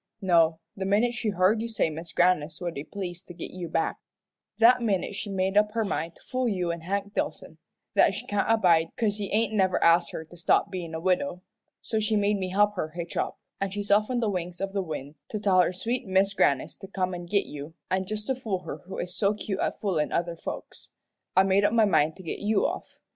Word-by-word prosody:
No 165 -5 +4 0.2
the 195 - -4
minute 210 +5 +2
she 230 -2 -1
heard 200 +3 +3
you 230 - -3
say 220 -7 +1
Mis' 165 +2 -7
Grannis 170 -3 +2
would 175 -2 -3
be 140 - -5
pleased 180 -1 -6
to 175 - -10
git 170 - -7
you 180 -2 -6
back, 165 0 0 0.6
that 245 +2 +6
minute 205 -4 0
she 205 +1 -5
made 190 0 0
up 210 0 +4
her 225 -1 0
mind 165 -3 -3
to - - -19
fool 255 -1 -1
you 180 -4 0
and 170 0 -5
Hank 200 +3 -3
Dillson - - -3 0.3
that - - +4
she - - -6
can't 205 +1 0
abide 175 -7 +4
'cause 210 -3 +1
he 205 -2 -4
ain't 220 0 +1
never 190 -3 +2
asked 170 +1 +5
her 160 - -6
to 170 - -15
stop 170 - +2
bein' 170 -4 -5
a - - -3
widow. 185 +3 0 0.4
So 220 - -1
she 215 0 +1
made 205 0 +2
me 185 -1 -2
help 205 +2 +3
her 155 - -1
hitch 170 +1 -6
up, - - -1 0.2
an' 195 - -1
she's 205 +1 -4
off 210 +2 +4
on 245 -1 0
the 225 - +1
wings 180 -1 -4
of 195 0 -3
the 200 - 0
wind 150 -4 -6
to 215 - -3
tell 190 -3 +4
her 175 - +2
sweet 225 +6 -2
Mis' 190 +1 +3
Grannis 140 -8 +2
to 195 - -10
come 185 -1 -2
an' 175 -1 -6
git 200 +2 +2
you; 150 +2 -8 0.2
an' 190 0 +1
just 215 0 -3
to 265 - +1
fool 220 -8 -3
her 160 - -5
who 190 - -6
is 180 +1 -4
so 200 +2 +2
cute 205 -1 -4
at - - -1
foolin' 175 -8 0
other 170 0 -1
folks, - - -7 0.5
I 190 - +8
made 195 +1 +3
up 205 +2 +3
my 225 -2 +5
mind 160 -5 +3
to 190 - -12
git 165 - -4
you 205 0 +2
off. - - -4
190 Hz, 245 wpm, -27 LUFS, 175-210 Hz, 0.6 s, I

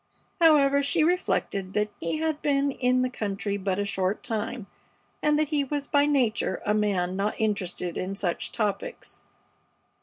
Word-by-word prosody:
However, 285 -4 +5
she 305 +3 +2
reflected 255 - 0
that 210 0 0
he 165 - -2
had 315 -1 -1
been 280 -1 +2
in 255 -1 +1
the 255 - 0
country 205 -2 -3
but 190 -1 -1
a 205 - 0
short 195 0 -1
time, 225 -1 -3 0.6
and 300 0 +3
that 305 -1 +1
he 295 -2 +1
was 285 +1 -3
by 285 0 +3
nature 240 -9 +1
a 210 - +2
man 195 -4 0
not 200 +2 -1
interested 185 -5 -2
in 190 +2 -3
such 180 -3 -2
topics. 220 - -3
220 Hz, 160 wpm, -26 LUFS, 200-285 Hz, 0.6 s, However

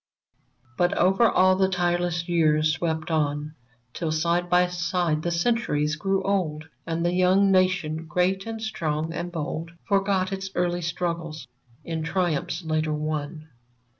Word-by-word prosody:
But 175 +2 +2
over 195 +5 +4
all 185 0 +4
the 190 0 +2
tireless 175 -1 0
years 155 -2 +3
swept 160 0 -2
on. 150 -1 -1 0.4
Till 165 -3 -2
side 170 +3 0
by 180 0 +5
side 175 -3 -1
the 175 - -1
Centuries 170 -5 0
grew 195 +4 0
old. 160 -6 -1 0.2
And 165 +1 -1
the 175 - +1
young 185 +2 +4
Nation, 180 -4 +1
great 185 +5 0
and 225 0 -4
strong 160 -6 -2
and 175 +1 -4
bold, 165 0 -4
Forgot 195 -2 +1
its 195 0 -4
early 175 0 0
struggles, 170 -4 -3 0.4
in 165 -1 -3
triumphs 175 0 -1
later 155 -1 0
won 155 +1 -4
175 Hz, 140 wpm, -25 LUFS, 155-185 Hz, 0.4 s, by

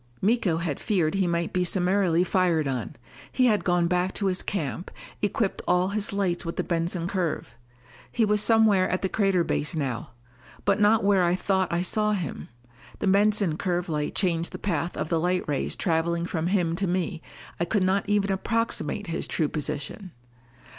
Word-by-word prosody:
Miko 200 -5 +2
had 165 -4 -3
feared 175 -7 +1
he 195 -2 +1
might 170 0 -1
be 180 - +1
summarily 180 -1 +2
fired 175 -5 +1
on. 130 -4 -3 0.4
He 255 - +2
had 215 -4 +3
gone 175 -1 +2
back 180 +2 0
to 200 - -2
his 190 -1 +1
camp, 175 -2 -3 0.3
equipped 205 0 0
all 180 +1 +3
his 205 0 -2
lights 195 -3 -1
with 165 -1 -4
the - - -1
Benson 170 0 -1
curve. 175 -10 -2 0.6
He 230 - +2
was 210 0 +3
somewhere 215 -4 +4
at 185 - -1
the 190 - +1
crater 195 -4 +2
base 155 +1 -2
now. 130 -6 -3 0.5
But 200 +1 +2
not 210 +1 +4
where 195 -2 +4
I 175 0 +2
thought 190 0 0
I 170 +1 0
saw 210 +3 +1
him! 180 -8 -4 0.5
The - - -3
Benson 200 -3 +3
curve 180 -1 -1
light 150 -2 -2
changed 170 -4 0
the - - -4
path 170 -3 -2
of - - -3
the 165 - +1
light 180 +2 0
rays 145 -3 -1
traveling 170 0 0
from 170 -2 -2
him 175 -3 +1
to 195 0 0
me, 175 -2 -2 0.4
I 170 - +1
could 195 +2 +1
not 190 +2 +1
even 205 -1 +2
approximate 225 +1 -1
his 165 -2 -3
true 155 -3 0
position! 150 +5 -4
180 Hz, 185 wpm, -26 LUFS, 170-200 Hz, 0.6 s, somewhere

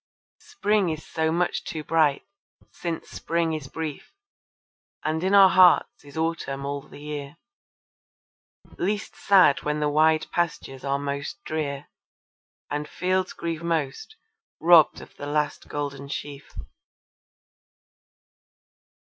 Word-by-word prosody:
Spring 215 - 0
is 155 -1 -5
so 160 -1 -1
much 175 +2 0
too 155 -1 -5
bright, 155 -3 +2 0.5
since 170 -2 -5
Spring 165 -1 -1
is 155 -4 -5
brief, 155 - -6 0.9
And 160 +2 -1
in 190 +2 +3
our 195 -1 +9
hearts 180 -1 +5
is 145 +2 -12
Autumn 160 -4 -2
all 140 0 -3
the - - -14
year, 145 0 -6 1.4
Least 205 +3 -2
sad 185 -8 +5
when 150 0 -1
the 150 0 +1
wide 155 +1 +3
pastures 155 -6 -2
are 140 0 0
most 140 0 -5
drear 145 -3 -3 0.9
And 150 +1 -3
fields 185 +1 -1
grieve 165 -1 -4
most 165 - -2 0.4
robbed 165 -2 +6
of - - -14
the 145 - -6
last 150 0 -1
gold 140 -1 -5
sheaf. 145 0 -6
155 Hz, 120 wpm, -25 LUFS, 145-170 Hz, 1.4 s, our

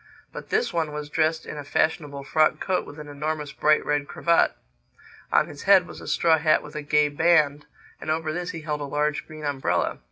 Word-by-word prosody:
But - - -8
this 440 +2 0
one 160 -3 -1
was 150 0 -6
dressed 160 +1 +1
in - - -7
a - - -6
fashionable 145 -1 -1
frock 155 +2 +2
coat 185 -1 -1
with 145 - -11
an 150 -1 -9
enormous 150 0 -4
bright 155 0 +2
red 145 -1 0
cravat. 170 - +2 0.8
On - - +4
his 145 - -10
head 190 -3 +7
was - - -11
a - - -10
straw 160 -2 +3
hat 155 0 +3
with 150 0 -12
a 150 - -3
gay 150 0 +3
band; 150 -1 +2 0.3
and - - -6
over 155 0 -1
this 175 +2 -4
he 165 - -6
held 150 -1 -3
a - - -3
large 150 +1 -1
green 155 -1 -9
umbrella. 140 -2 -1
150 Hz, 215 wpm, -25 LUFS, 145-160 Hz, 0.8 s, head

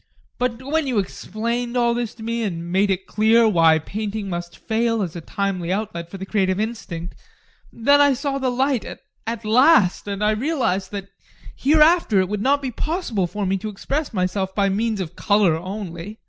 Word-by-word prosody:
But 250 0 -1
when 300 +2 0
you 250 -4 0
explained 235 +5 -2
all 235 -1 +3
this 235 -2 -3
to 225 - -11
me, 230 +1 -2
and 170 -5 -3
made 195 +2 +2
it 190 0 -1
clear 220 +2 +4
why 165 -6 +5
painting 205 +4 -4
must 175 0 -5
fail 230 -1 0
as 175 -3 -5
a 170 - -5
timely 185 -1 -2
outlet 185 -4 -3
for 195 - -8
the 190 - -6
creative 190 -2 0
instinct, 195 -6 -4 0.6
then 285 +5 +4
I 285 -1 +5
saw 275 +1 -2
the 260 -1 0
light 260 0 +1
at 230 0 -8
last 225 - +4
and 200 0 -3
I 210 - +3
realised 220 - -1
that 200 -1 -6 0.5
hereafter 305 - +4
it 185 -1 +1
would 210 -1 -2
not 280 +4 +2
be 260 - -2
possible 245 - -2
for 205 +3 -3
me 190 +1 0
to 215 +3 -4
express 275 +9 -3
myself 190 -1 -1
by 200 -1 +2
means 215 +2 0
of 175 -2 -6
colour 200 -5 +3
only. 185 +2 -6
215 Hz, 190 wpm, -22 LUFS, 190-240 Hz, 0.6 s, why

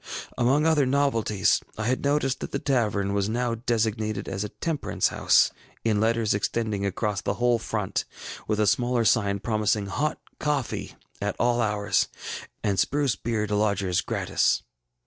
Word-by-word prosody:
ŌĆ£Among 135 +5 +3
other 155 -4 +3
novelties, 115 -8 +2 0.2
I 110 - -2
had 130 +3 0
noticed 140 -2 +1
that - - -5
the - - 0
tavern 105 -7 0
was 100 0 0
now 120 +1 0
designated 110 -3 -1
as 95 +2 -3
a 105 - -4
Temperance 160 +5 -1
House, - - +4 0.3
in 110 -2 +2
letters 115 -1 +2
extending 105 0 -1
across 100 0 -1
the - - -1
whole 120 -1 +2
front, 105 -3 -2 0.4
with 110 0 0
a 105 - +4
smaller 120 +1 +2
sign 100 -2 +3
promising 105 -1 0
Hot 145 +10 -1 0.2
Coffee 145 -4 -2 0.3
at 100 0 -1
all 120 0 +2
hours, 105 -2 +1 0.6
and 100 -2 +1
Spruce 140 -4 +1
Beer 115 -2 -1
to 105 0 -1
lodgers 100 -4 +1
gratis. - - +1
110 Hz, 155 wpm, -26 LUFS, 105-125 Hz, 0.6 s, House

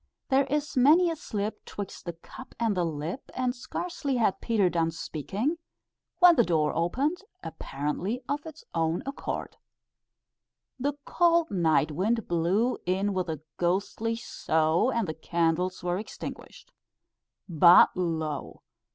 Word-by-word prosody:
"There 275 0 +4
is 295 +2 -2
many 315 +7 +5
a - - -3
slip 210 -7 -4
'twixt 200 -2 -7
the 170 - -4
cup 170 +10 -13
and 225 -3 +1
the 180 - +1
lip;" 165 - -4
and 255 -1 0
scarcely 280 +3 -3
had 220 -5 +1
Peter 215 -5 +2
done 165 -2 +1
speaking, 195 - -3 0.6
when 355 -2 +8
the 240 - +5
door 155 -5 +1
opened, 265 - 0 0.3
apparently 170 - -3
of 290 +1 -2
its 315 -1 -11
own 165 0 0
accord. 275 +1 -5 1.2
The 285 +3 0
cold 340 -2 +3
night 160 -4 +2
wind 210 +8 0
blew 180 +9 +1
in 195 +3 +1
with 185 -2 -2
a 155 -3 -4 0.2
ghostly 200 +6 0
sough, 160 -4 +1
and 230 -5 0
the 160 - -2
candles 170 +3 -1
were 180 +1 0
extinguished. 215 - -9 0.7
But 170 0 +7
lo! 160 -5 -3
195 Hz, 135 wpm, -28 LUFS, 165-255 Hz, 1.2 s, when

